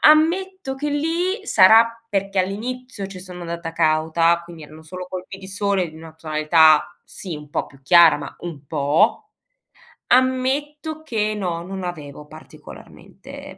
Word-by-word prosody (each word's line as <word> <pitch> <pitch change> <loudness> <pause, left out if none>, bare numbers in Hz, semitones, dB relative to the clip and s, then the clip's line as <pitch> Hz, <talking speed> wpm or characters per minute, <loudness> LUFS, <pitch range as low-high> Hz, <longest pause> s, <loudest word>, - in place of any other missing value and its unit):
ammetto 335 0 +3
che 295 +2 -3
lì 345 +8 -1
sarà 230 +4 +5
perché 195 -2 -2
all'inizio 220 +3 -5
ci 190 -1 -10
sono 180 -1 -10
andata 170 -1 -6
cauta, 165 +1 +2
quindi 170 -2 -12
erano 155 +2 -14
solo 180 +3 -8
colpi 185 +1 -7
di 190 - -11
sole 200 -2 -1
di 155 - -15
una 160 0 -12
tonalità, 155 0 +3
sì, 180 -5 -8
un 150 -1 -12
po' - - -2
più 135 -1 -20
chiara, 170 +3 +6
ma - - -8
un 155 -5 -8
po', 160 - +1 0.8
ammetto 275 +5 0
che 215 -7 -1
no, 175 -5 -3
non 190 +1 -7
avevo 150 -4 -7
particolarmente 155 +1 -13
185 Hz, 145 wpm, -21 LUFS, 160-255 Hz, 0.8 s, chiara